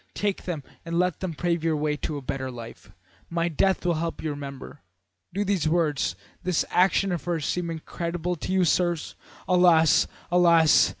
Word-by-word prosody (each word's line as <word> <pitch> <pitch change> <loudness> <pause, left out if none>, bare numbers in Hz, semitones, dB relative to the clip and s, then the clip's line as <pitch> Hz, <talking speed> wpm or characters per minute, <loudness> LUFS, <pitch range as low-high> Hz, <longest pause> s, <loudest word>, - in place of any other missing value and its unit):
Take 205 -2 -2
them 165 -6 -4 0.2
and 170 0 -3
let 180 -2 +1
them 180 -4 -4
pave 170 0 -1
your 165 -1 +1
way 150 0 0
to 150 0 -4
a 140 - -7
better 130 0 -3
life. 120 -2 -10 0.4
My 170 0 0
death 190 +4 +1
will 175 - +3
help 165 +1 -3
you 155 - -3
to - - -2
remember.' 140 0 -8 0.5
Do 200 +3 -1
these 190 -5 +1
words, 155 - +1 0.3
this 180 -3 0
action 190 +1 +3
of 175 - -3
hers, 165 -4 -1
seem 175 -1 -1
incredible 170 +2 -3
to 160 - -5
you, 190 -1 +3
sirs? 175 -1 0 0.3
Alas! 175 -3 +5 0.2
alas! 170 -3 +5
170 Hz, 180 wpm, -26 LUFS, 155-180 Hz, 0.5 s, Alas